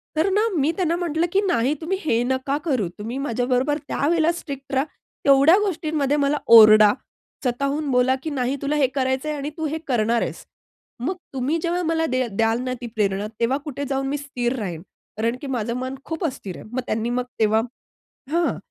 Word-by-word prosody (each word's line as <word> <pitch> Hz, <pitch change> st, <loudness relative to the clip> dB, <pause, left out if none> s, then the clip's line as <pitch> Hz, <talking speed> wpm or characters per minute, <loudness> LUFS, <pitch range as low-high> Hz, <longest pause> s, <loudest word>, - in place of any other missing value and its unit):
तर 320 Hz, +5 st, +2 dB
ना, 420 Hz, +4 st, +2 dB
मी 295 Hz, +4 st, +2 dB
त्यांना 340 Hz, -3 st, +1 dB
म्हंटलं, 340 Hz, -2 st, 0 dB
"की 395 Hz, -, +4 dB
नाही 285 Hz, -, +1 dB
तुम्ही 375 Hz, +4 st, -1 dB
हे 230 Hz, -5 st, +2 dB
नका 260 Hz, +2 st, -1 dB
करू. 255 Hz, -, +1 dB
तुम्ही 230 Hz, +5 st, -4 dB
माझ्याबरोबर 250 Hz, +4 st, 0 dB
त्यावेळेला 325 Hz, +3 st, +2 dB
स्ट्रिक्ट 275 Hz, -5 st, -7 dB
राहा. 265 Hz, +2 st, +2 dB, 0.4 s
तेवढ्या 280 Hz, +6 st, +6 dB
गोष्टींमध्ये 310 Hz, -7 st, 0 dB
मला 285 Hz, +1 st, +2 dB, 0.2 s
ओरडा, 215 Hz, -1 st, +9 dB, 0.5 s
स्वतःहून 280 Hz, +4 st, -1 dB
बोला 250 Hz, +1 st, +3 dB
की 315 Hz, -, -2 dB
"नाही 265 Hz, -1 st, -1 dB
तुला 280 Hz, +2 st, 0 dB
हे 280 Hz, -3 st, +3 dB
करायच 260 Hz, +1 st, 0 dB
आहे 305 Hz, -1 st, -2 dB
आणि 285 Hz, +1 st, -4 dB
तू 320 Hz, -, -2 dB
हे 310 Hz, -, -2 dB
करणार 235 Hz, -2 st, +1 dB
आहेस." -, -, -4 dB, 0.5 s
मग 320 Hz, +10 st, -2 dB, 0.2 s
तुम्ही 270 Hz, +5 st, 0 dB
जेव्हा 350 Hz, +1 st, 0 dB
मला 325 Hz, 0 st, +1 dB
दे 255 Hz, -3 st, 0 dB
द्याल 225 Hz, +3 st, +1 dB
ना 255 Hz, 0 st, -2 dB
ती 240 Hz, -, -4 dB
प्रेरणा, 200 Hz, -1 st, 0 dB
तेव्हा 245 Hz, +4 st, +2 dB
कुठे 285 Hz, -1 st, -4 dB
जाऊन 270 Hz, 0 st, -1 dB
मी 290 Hz, +2 st, -1 dB
स्थिर 260 Hz, -3 st, -2 dB
राहील. 175 Hz, -6 st, -4 dB, 0.4 s
कारण 230 Hz, +2 st, 0 dB
की 285 Hz, -, -6 dB
माझं 235 Hz, -3 st, -2 dB
मन 260 Hz, +1 st, -4 dB
खूप 325 Hz, +1 st, -4 dB
अस्थिर 230 Hz, -, -5 dB
आहे. -, -, -11 dB
मग 255 Hz, -, -2 dB
त्यांनी 225 Hz, +2 st, -1 dB
मग 250 Hz, -, 0 dB, 0.2 s
तेव्हा 220 Hz, 0 st, +3 dB, 0.7 s
हां 340 Hz, +1 st, +1 dB
270 Hz, 190 wpm, -23 LUFS, 240-310 Hz, 0.7 s, ओरडा